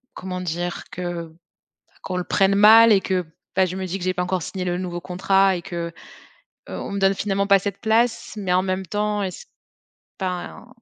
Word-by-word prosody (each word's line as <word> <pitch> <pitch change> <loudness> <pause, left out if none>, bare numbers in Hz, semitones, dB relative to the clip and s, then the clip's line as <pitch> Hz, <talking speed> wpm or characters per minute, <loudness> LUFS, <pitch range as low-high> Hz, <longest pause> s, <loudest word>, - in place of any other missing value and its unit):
comment 180 -1 -5
dire? 175 0 -3
Que 175 -2 -5 0.7
qu'on 180 -1 -3
le 180 - -1
prenne 195 0 +2
mal, 220 +3 +8
et 195 - +4
que, 185 -2 -1 0.3
bah, 190 0 +4
je 180 - -5
me 190 - -3
dis 190 +2 -4
que - - -6
j'ai 185 - +1
pas 180 - 0
encore 180 0 -1
signé 185 -2 -5
le 175 0 -1
nouveau 175 -1 -4
contrat 190 +2 +2
et - - -7
que, 170 -2 -5 0.8
heu, - - -5
on - - -6
me 200 - -2
donne 195 0 +4
finalement 200 0 -1
pas 200 -1 +6
cette 200 0 -4
place, 230 +1 +1
mais 185 -3 -1
en 185 - +4
même 190 0 -2
temps, 210 +2 -1
est-ce 190 - -6 0.7
enfin, 185 +4 -5
190 Hz, 205 wpm, -22 LUFS, 180-200 Hz, 0.8 s, mal